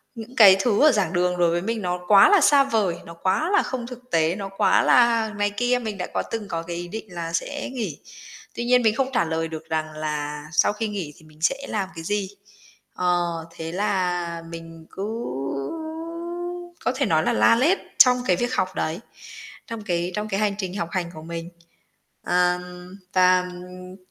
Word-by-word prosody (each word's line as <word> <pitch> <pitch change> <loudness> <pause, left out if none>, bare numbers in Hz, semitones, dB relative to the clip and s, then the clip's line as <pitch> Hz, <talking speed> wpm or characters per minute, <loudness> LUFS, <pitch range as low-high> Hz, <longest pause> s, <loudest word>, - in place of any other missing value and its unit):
những, 230 +3 -9
cái, 195 -5 +8
thứ 215 +1 +2
ở 305 - +7
giảng 195 -6 0
đường 180 0 +1
đối 175 -1 +3
với 175 +1 0
mình 225 +2 -2
nó 180 -1 -2
quá 200 - +8
là 410 -2 +5
xa 280 -2 +6
vời, 215 -9 0
nó 170 - -9
quá 185 - 0
là 405 - +5
không 250 -3 -4
thực 250 0 -11
tế, 165 +1 +2
nó 195 -1 -5
quá - - +4
là 230 -3 +4
này 205 0 +1
kia, 245 +4 0
mình 215 -4 -5
đã 180 - -3
có - - 0
từng 220 -3 -4
có 165 -3 -3
cái 170 0 -6
ý 175 - -5
định 220 +5 -6
là 165 -1 -5
sẽ 285 +13 -3
nghỉ. 220 - -4 0.6
Tuy 235 - -3
nhiên 250 +1 +4
mình 220 -1 +3
không 265 +2 0
trả 170 - +2
lời 160 0 -2
được 160 0 -8
rằng 155 -1 -2
là 150 -1 -4
sau 180 - +3
khi 220 +1 -3
nghỉ 190 -8 -5
thì - - -19
mình 155 0 -19
sẽ 225 +11 +3
làm 195 -3 -2
cái 165 - -7
gì. 200 +2 -1 0.6
Ờ, 180 -1 +1 0.3
thế 165 -1 -6
là 180 -3 -1
mình 165 -1 -10
cứ 195 - -6 1.8
có - - +3
thể 275 -1 +1
nói 160 -5 +2
là - - +1
la 110 - +5
lét 315 +11 +3 0.2
trong 250 -1 +7
cái 180 - +4
việc 240 +6 -2
học 185 -5 -1
đấy, 160 +3 -2 0.7
trong 230 -2 -6
cái 175 -2 -1
trong 210 0 -2
cái 195 - -1
hành 210 -2 +1
trình 190 -2 -4
học 170 -2 -3
hành 175 -2 -2
của 155 - -9
mình. 165 +1 -6 0.7
À, 180 0 +2 0.5
và, 185 0 +5
ừm, 180 +1 -10
185 Hz, 205 wpm, -24 LUFS, 170-225 Hz, 1.8 s, cái